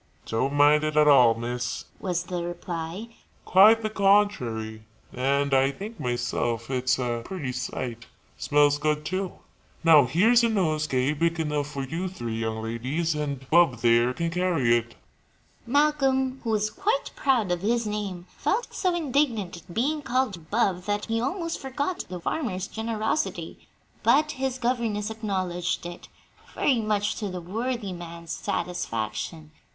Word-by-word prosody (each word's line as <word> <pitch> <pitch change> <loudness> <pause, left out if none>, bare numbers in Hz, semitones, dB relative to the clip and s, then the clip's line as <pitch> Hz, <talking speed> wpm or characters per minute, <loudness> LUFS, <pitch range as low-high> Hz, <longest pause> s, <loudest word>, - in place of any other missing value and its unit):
"Don't 130 +5 -1
mind 145 +1 +5
it 155 0 -1
at 150 0 +6
all, 125 -5 +7
miss," 120 +2 -4
was 180 -2 -1
the 180 -1 -4
reply 175 +4 -5 0.4
"quite 215 +4 +6
the 215 - 0
contrary; 160 - +1 0.3
and 140 +2 +1
I 135 0 +4
think, 205 +10 -8
myself, 120 -1 -2
it's 130 -1 +1
a 120 -2 -2
pretty 160 -7 -4
sight. 125 -2 -5 0.3
Smells 145 0 +3
good, 150 0 0
too. 185 +3 -2 0.5
Now, 155 -4 +7
here's 220 - +4
a 230 - +3
nosegay 155 - +1
big 165 +2 0
enough 150 -2 -1
for 140 -2 -5
you 165 +7 -3
three 120 -11 -5
young 110 0 -3
ladies, 130 +9 -1
and 140 -3 -4
Bub 160 -8 +4
there 120 +1 +4
can 170 0 -2
carry 165 -9 +2
it." 120 0 -2 0.7
Malcolm, 270 -1 +2
who 230 - -3
was 215 -1 +1
quite 425 +6 -1
proud 245 -9 +1
of 175 -1 -1
his 230 +3 +1
name, 205 -4 -4
felt 465 +4 -1
so 365 -3 0
indignant 265 - 0
at 170 +1 -14
being 290 - 0
called 240 - -1
"Bub" 200 -5 +1
that 205 0 -1
he 225 0 -1
almost 335 +6 -2
forgot 285 +6 -3
the 180 -1 -5
farmer's 190 - -2
generosity; 220 +6 -3 0.3
but 305 0 +4
his 265 -2 -2
governess 230 -4 -1
acknowledged 185 -6 -2
it, 175 0 -8 0.5
very 260 -4 +2
much 210 -1 0
to 210 -3 -3
the 180 -1 -5
worthy 220 +3 -3
man's 170 -1 -8
satisfaction. 155 -2 -3
175 Hz, 150 wpm, -26 LUFS, 140-225 Hz, 0.7 s, all